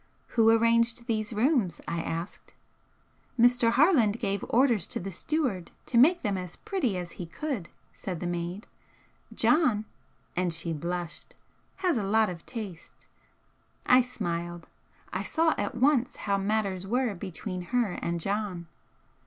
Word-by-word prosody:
"Who 225 Hz, -2 st, +4 dB
arranged 230 Hz, +1 st, +3 dB
these 215 Hz, -2 st, -1 dB
rooms?" 220 Hz, -, +1 dB
I 170 Hz, -, -1 dB
asked. 165 Hz, +3 st, -6 dB, 0.8 s
"Mr. 240 Hz, -1 st, +5 dB
Harland 245 Hz, -, +4 dB
gave 200 Hz, -3 st, -1 dB
orders 240 Hz, -5 st, +3 dB
to -, -, -3 dB
the 195 Hz, +2 st, -5 dB
steward 220 Hz, -, -1 dB, 0.2 s
to 240 Hz, -, 0 dB
make 345 Hz, +8 st, +5 dB
them 200 Hz, -4 st, 0 dB
as 180 Hz, -2 st, -7 dB
pretty 370 Hz, -, -1 dB
as 175 Hz, -1 st, -5 dB
he 175 Hz, -, -7 dB
could," 240 Hz, -, -4 dB, 0.2 s
said 180 Hz, -4 st, -5 dB
the 180 Hz, -, -4 dB
maid 175 Hz, +3 st, -3 dB, 0.7 s
"John" 250 Hz, -10 st, +3 dB, 0.5 s
and 180 Hz, -1 st, +1 dB
she 165 Hz, 0 st, -2 dB
blushed 170 Hz, +2 st, -5 dB, 0.5 s
"has 345 Hz, -7 st, +3 dB
a 215 Hz, -, -1 dB
lot 215 Hz, 0 st, +3 dB
of 170 Hz, -2 st, -9 dB
taste." 205 Hz, -8 st, -8 dB, 0.8 s
I 250 Hz, +1 st, +7 dB
smiled. 175 Hz, -8 st, -4 dB, 0.5 s
I -, -, -1 dB
saw 325 Hz, 0 st, +2 dB
at 205 Hz, -, -3 dB
once 260 Hz, 0 st, +2 dB
how 200 Hz, -1 st, -1 dB
matters 195 Hz, -2 st, 0 dB
were 245 Hz, +1 st, +1 dB
between 185 Hz, 0 st, -5 dB
her 235 Hz, +2 st, 0 dB
and 170 Hz, 0 st, -1 dB
"John." 195 Hz, -1 st, -2 dB
210 Hz, 145 wpm, -28 LUFS, 180-245 Hz, 0.8 s, I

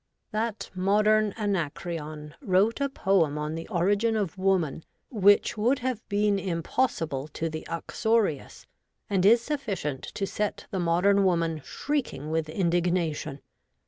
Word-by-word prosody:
That 220 Hz, 0 st, -3 dB
modern 210 Hz, +3 st, +3 dB
Anacreon 155 Hz, -6 st, -3 dB
wrote 210 Hz, +2 st, +2 dB
a 280 Hz, -, +1 dB
poem 185 Hz, -, +1 dB
on 150 Hz, +1 st, -3 dB
the 165 Hz, 0 st, -6 dB
origin 205 Hz, +4 st, +1 dB
of 200 Hz, -6 st, -2 dB
woman 185 Hz, -5 st, 0 dB, 0.3 s
which 205 Hz, -1 st, +4 dB
would 245 Hz, +6 st, +3 dB
have 250 Hz, -3 st, -2 dB
been 205 Hz, -1 st, +2 dB
im 170 Hz, -4 st, -2 dB
possible 155 Hz, -, -1 dB
to 165 Hz, -, -2 dB
the 155 Hz, 0 st, -6 dB
uxorious, 205 Hz, -1 st, -1 dB, 0.5 s
and 190 Hz, -2 st, +2 dB
is 230 Hz, +2 st, +6 dB
sufficient 200 Hz, -, -3 dB
to 195 Hz, -, -1 dB
set 210 Hz, +1 st, -3 dB
the 190 Hz, -, -2 dB
Modern 180 Hz, +4 st, +3 dB
Woman 165 Hz, -4 st, +1 dB
shrieking 245 Hz, -, -3 dB
with 160 Hz, -1 st, -1 dB
indignation. 170 Hz, -4 st, 0 dB
190 Hz, 135 wpm, -27 LUFS, 165-215 Hz, 0.5 s, is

